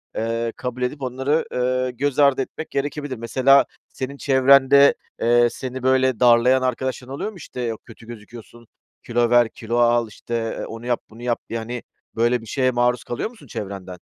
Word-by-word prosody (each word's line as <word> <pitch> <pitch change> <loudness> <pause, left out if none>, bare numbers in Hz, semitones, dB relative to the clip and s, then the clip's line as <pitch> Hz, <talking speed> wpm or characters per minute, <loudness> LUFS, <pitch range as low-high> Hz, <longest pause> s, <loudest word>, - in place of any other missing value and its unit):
eee, 115 +1 -2
kabul 125 0 -5
edip 130 +3 -2
onları, 135 +4 -1
eee, 130 0 0
göz 140 +3 -2
ardı 140 -2 +4
etmek 160 +4 -6
gerekebilir. 140 -1 -3
Mesela 130 +4 +4 0.2
senin 135 +1 -6
çevrende, 140 +1 +5 0.3
eee, 120 +1 +4
seni, 130 0 -6
böyle, 130 -2 +2
darlayan 125 +2 +5
arkadaşların 130 +1 -3
oluyor 215 - -4
mu? 190 - -14
İşte, 130 -5 -8
yok, 115 -2 -3
"Kötü 115 0 -15
gözüküyorsun. 115 +1 -12 0.4
Kilo 120 0 +1
ver, 120 -1 +4
kilo 115 +1 -4
al." 120 -1 +3
İşte, 115 +2 -9 0.3
eee; - - -4
"Onu 115 +1 -9
yap, 120 -1 0
bunu 115 +2 -14
yap." 120 -1 0
diye. 115 - -3
Yani, 120 +2 -6 0.3
böyle 120 +1 +2
bir - - -12
şeye 130 +2 0
maruz 120 0 +1
kalıyor 120 - -4
musun 220 - -17
çevrenden? 95 -4 -7
125 Hz, 180 wpm, -22 LUFS, 115-130 Hz, 0.4 s, çevrende